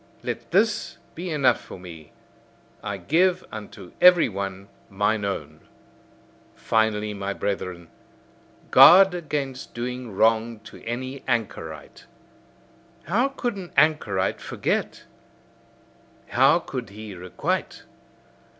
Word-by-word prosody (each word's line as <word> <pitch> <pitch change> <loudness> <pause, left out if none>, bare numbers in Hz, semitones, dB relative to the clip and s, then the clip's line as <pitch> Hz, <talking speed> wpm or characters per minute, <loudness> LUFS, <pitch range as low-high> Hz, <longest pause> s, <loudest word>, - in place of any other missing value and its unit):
Let - - -5
this - - +1 0.2
be 175 +2 -6
enough 150 -5 +2
for - - -11
me: 85 -4 -12 0.7
I 100 -1 -3
give 180 - +1
unto 105 -3 -9
every 180 -5 +7
one 95 -1 -5 0.2
mine 105 +2 0
own. 80 -6 -4 1.0
Finally, 105 -1 0
my 100 0 -4
brethren, 90 -4 -4 0.8
guard 190 +2 +9
against 145 -6 -4
doing 125 0 -5
wrong 110 +2 +2
to - - -13
any 130 +4 -5
anchorite. 80 - -4 1.0
How 225 - +1
could 250 -4 -3
an 185 -3 -8
anchorite 105 -12 +2
forget! - - -2 1.3
How - - +5
could - - -6
he 105 0 -9
requite! 90 -1 -3
110 Hz, 105 wpm, -24 LUFS, 100-150 Hz, 1.3 s, guard